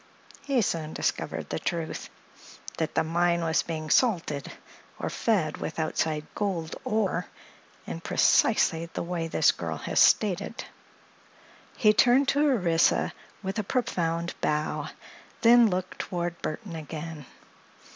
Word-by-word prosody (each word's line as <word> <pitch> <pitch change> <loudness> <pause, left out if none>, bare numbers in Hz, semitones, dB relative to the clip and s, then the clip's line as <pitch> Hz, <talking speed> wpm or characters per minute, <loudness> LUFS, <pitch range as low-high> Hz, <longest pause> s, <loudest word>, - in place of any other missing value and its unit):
He 270 -5 +2
soon 160 -4 -2
discovered - - -2
the - - -2
truth—that 160 -1 -6
the 160 - +3
mine 170 +1 +1
was 160 0 +2
being 155 -2 -5
'salted' 170 - +1 0.5
or - - -3
fed 185 -10 0
with - - -5
outside 155 -1 -1
gold 175 -6 -2
ore 215 -7 0 0.6
in 80 +1 -6
precisely 165 +1 +3
the - - -5
way 170 -1 -3
this - - +4
girl - - -5
has - - -1
stated." 210 +2 +3 1.1
He 215 -2 +5
turned 250 +5 +4
to 290 +1 +2
Orissa 175 -10 +2 0.3
with 195 +3 -3
a - - 0
profound 175 -8 -1
bow, 150 0 -1 0.5
then 235 -1 +7
looked 185 0 -3
toward 175 -2 -3
Burthon 170 +3 -5
again. 155 -2 -7
170 Hz, 125 wpm, -27 LUFS, 160-210 Hz, 1.1 s, then